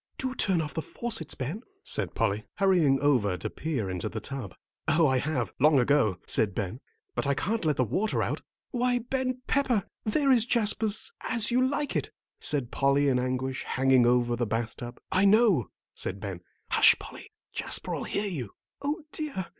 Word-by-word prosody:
"Do 260 -1 -2
turn 190 -9 +1
off 150 - -6
the 160 - -2
faucets, 215 -5 -3
Ben," 145 - -4 0.2
said - - 0
Polly, 105 -1 0
hurrying 175 -9 +3
over 120 -10 +2
to - - -5
peer 140 -10 -3
into 90 -2 -3
the 110 - -5
tub. 120 -5 -7 0.3
"Oh, 155 +2 +4
I 130 -2 +3
have, 135 -4 -2
long 150 +2 +5
ago," 125 -7 +3
said 100 -4 +1
Ben, 100 +6 -3 0.3
"but 120 +2 -1
I 140 - +2
can't 215 +8 -1
let 150 -3 +1
the 130 - +3
water 205 - 0
out." - - -2 0.3
"Why, 245 -1 +1
Ben 255 +1 -2
Pepper, 250 -8 +1 0.2
there 275 +6 +2
is 235 -2 +4
Jasper's 220 - +1
'As 235 -1 +1
You 250 +2 +3
Like 285 +2 -1
It,'" - - -1 0.3
said 140 -5 +1
Polly, 140 +1 +2
in 125 -2 +2
anguish, 130 +1 -2
hanging 130 -2 +3
over 120 -1 +2
the 120 -1 -1
bath 115 +1 -2
tub. 120 0 -8
"I 190 - +3
know 210 - +5
it," 105 - -12 0.3
said 95 - -2
Ben. 95 -3 -6 0.3
"Hush, - - +7
Polly, - - -11 0.2
Jasper'll - - -1
hear 205 - -2
you." 140 - -5 0.3
"O 295 +4 -2
dear! 290 - -3
145 Hz, 185 wpm, -28 LUFS, -, 0.3 s, Hush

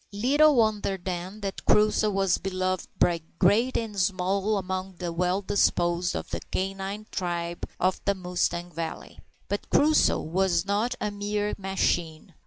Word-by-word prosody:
Little 280 +9 +4
wonder, 215 -4 +1
then, 185 +3 -5
that 195 -1 -4
Crusoe 215 0 +4
was 195 -2 +1
beloved 185 -1 -2
by 170 -1 +2 0.2
great 215 +7 +3
and 215 -3 -3
small 190 +3 +1
among 185 0 -4
the 175 -1 -4
well 180 +3 0
disposed 175 -2 +1
of - - -5
the - - -2
canine 195 +2 -3
tribe 170 -1 -3
of 185 +1 +1
the 200 - +2
Mustang 175 -1 -2
Valley. 165 0 -6 0.3
But 205 +1 -4
Crusoe 305 +2 +4
was 175 +1 +1
not 210 +5 0
a 210 - -2
mere 205 0 -2
machine. 175 -5 -1
190 Hz, 145 wpm, -27 LUFS, 180-205 Hz, 0.3 s, Little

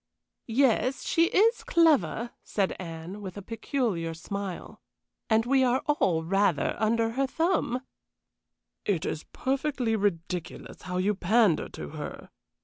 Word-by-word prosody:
"Yes, 255 +2 +2
she 330 - +3
is 440 +7 +3
clever," 300 -8 +3
said 195 -3 -1
Anne, 170 +3 -7
with 190 -1 -7
a 200 - -7
peculiar 220 - -2
smile, 195 +2 -6 0.5
"and 225 0 +3
we 265 +1 +3
are 255 +1 +2
all 180 - +1
rather 185 -3 +2
under 225 +1 +2
her 270 +3 0
thumb." 320 -5 0 1.0
"It 185 -3 0
is 155 - -3
perfectly 265 -4 -1
ridiculous 180 -4 -3
how 180 0 -4
you 195 +3 +2
pander 205 -1 +2
to 75 - -7
her!" - - -7
220 Hz, 130 wpm, -28 LUFS, 180-260 Hz, 1.0 s, she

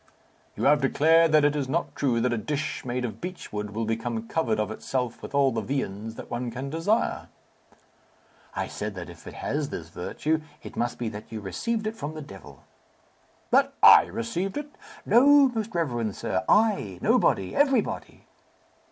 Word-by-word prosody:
"You - - -4
have 145 +1 +5
declared 160 +4 +4
that 155 -1 +5
it 145 0 +2
is 140 -3 -2
not 170 +5 -1
true 125 -5 +1
that 125 0 +1
a - - 0
dish 150 +5 -3
made 125 0 -2
of 110 -2 -6
beech 180 -8 -7
wood 105 0 -3
will 115 0 -1
become 115 0 -3
covered 115 -9 0
of 105 0 -1
itself 125 +1 -3
with - - -7
all 140 -1 +4
the 115 - -2
viands 110 -3 -3
that - - -10
one 120 +1 -2
can 130 +4 -5
desire." 185 +9 0 1.3
"I - - -1
said, - - -5
that - - -7
if - - -15
it - - -9
has - - -2
this - - -6
virtue, 155 +1 -2 0.2
it - - -9
must 120 0 -1
be 120 - -3
that 105 0 -10
you 110 - -4
received 215 - -3
it 215 +1 -2
from 155 -7 -6
the 155 - -6
devil." 95 -8 -13 0.9
"That - - +4
I - - +10
received 175 - -3
it!" 295 0 -5 0.3
"No, 280 +3 +6
most 225 -4 -4
reverend 120 - -1
sir. 95 - -2
I, 205 - +3
nobody, 95 -1 +2
everybody!" 270 -5 0
135 Hz, 180 wpm, -26 LUFS, 115-165 Hz, 1.3 s, I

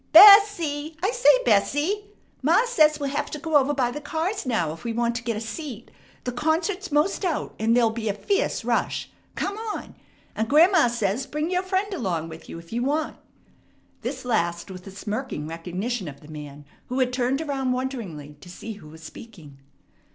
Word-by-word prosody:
B - - +10
es 405 +1 +11
see! 310 -5 -4
I 395 - +2
say, 485 +1 +4 0.2
Bessie! 300 - +2 0.4
Ma 330 - +4
says 310 -10 +4
we'll 280 -1 -2
have 295 +1 -2
to - - -5
go 315 +1 -3
over 285 0 +5
by 260 -4 0
the 295 - -6
cars 325 +4 -2
now 175 -11 0
if 165 - -12
we 235 - -2
want 235 0 0
to 230 - -7
get 230 -2 -2
a - - -2
seat. 235 +1 -7 0.3
The 250 - -2
concert's 325 +7 -1
most 300 +8 +1
out, 345 -5 -1
and 225 +2 +3
there'll 230 -2 +4
be 220 -1 -3
a - - +1
fierce 395 - -1
rush. - - -1 0.2
Come 400 +1 -2
on! 445 -2 -5 0.4
And 220 +1 -1
grandma 325 0 +6
says, 235 +2 -1
bring 300 +3 -2
your 365 0 +2
friend 380 +2 -1
along 175 - -2
with 160 0 -11
you - - -7
if 165 +4 -12
you 240 - -1
want." 300 +4 -1 0.8
This 255 +1 -5
last 170 -6 -1
with 185 +1 -10
a - - -8
smirking 205 - -4
recognition 180 +6 -4
of 140 -1 -9
the 150 - -14
man, 150 -1 -9 0.2
who 255 - -3
had 255 -1 +1
turned 255 +2 0
around 275 -4 -1
wonderingly 200 - -5
to 180 - -12
see 220 +5 -7
who 195 -7 -13
was 160 +1 -13
speaking. 160 -7 -12
255 Hz, 200 wpm, -25 LUFS, 200-315 Hz, 0.8 s, es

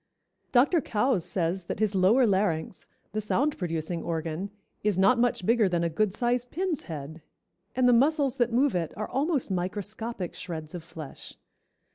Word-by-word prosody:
Dr. 285 +7 +4
Coues 215 -5 +1
says 175 +1 -1
that - - -4
his 215 -1 +1
lower 200 +7 +5
larynx, 190 -5 0 0.2
the 215 - -2
sound 280 +8 +1
producing 165 -1 -2
organ, 165 +3 -3 0.3
is 210 -3 +1
not 235 +6 +4
much 240 -6 +1
bigger 225 -2 +4
than 170 -1 0
a 170 - 0
good 210 +5 +1
sized 245 +3 0
pin's 340 -1 -2
head, 155 +1 -6 0.5
and 255 0 +3
the 245 - +6
muscles 275 +1 +3
that 240 -1 +2
move 265 +4 +3
it 170 -3 -2
are 215 - -3
almost 280 - 0
microscopic 205 +2 -3
shreds 160 -3 -6
of 175 -2 -6
flesh. 160 -3 -10
205 Hz, 165 wpm, -28 LUFS, 170-245 Hz, 0.5 s, the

